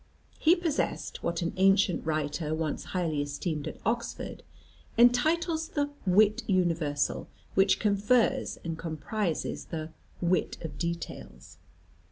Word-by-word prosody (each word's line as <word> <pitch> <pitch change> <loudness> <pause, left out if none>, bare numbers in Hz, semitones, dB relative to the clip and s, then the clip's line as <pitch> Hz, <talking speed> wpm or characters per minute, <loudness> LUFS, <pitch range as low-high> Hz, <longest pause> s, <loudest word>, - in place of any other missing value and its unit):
He 325 +3 +6
possessed 340 -4 -2
what 170 0 -1
an 170 - -2
ancient 195 -1 +4
writer, 155 0 -1
once 155 -2 -2
highly 165 -5 -1
esteemed 145 +1 -3
at - - -6
Oxford, 235 +3 -2 0.6
entitles 315 +7 +3
the 290 -1 -1 0.2
"wit 210 +3 +5
universal," 165 -7 +1 0.3
which 195 0 +4
confers 210 +3 +2
and 165 -1 -3
comprises 165 +2 -2
the 160 -1 -5 0.3
"wit 180 +1 +1
of 160 - -6
details." 170 -1 -5
180 Hz, 115 wpm, -29 LUFS, 160-225 Hz, 0.6 s, He